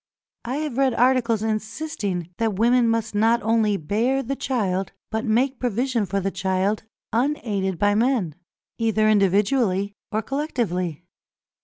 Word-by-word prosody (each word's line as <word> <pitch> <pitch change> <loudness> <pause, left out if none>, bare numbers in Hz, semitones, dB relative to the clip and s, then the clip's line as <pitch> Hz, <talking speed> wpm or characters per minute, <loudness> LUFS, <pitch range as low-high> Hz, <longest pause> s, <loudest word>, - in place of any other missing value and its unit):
I 250 +3 -2
have 295 -4 -3
read 265 -3 +3
articles 240 -3 +2
insisting 215 - -3
that 225 -3 0
women 235 +3 +3
must 225 -1 -1
not 225 +3 +3
only 220 -2 +2
bear 230 - 0
the 270 +3 -3
child, 205 -9 -1 0.2
but 220 +2 -2
make 245 +4 +1
provision 245 -2 0
for 195 +2 -1
the 195 0 -2
child, 190 +3 0 0.3
unaided 220 - 0
by 205 +3 +3
men, 220 - +1 0.5
either 220 -1 +2
individually 200 0 +2 0.2
or 215 +1 -1
collectively. 205 - -2
220 Hz, 135 wpm, -23 LUFS, 200-250 Hz, 0.5 s, read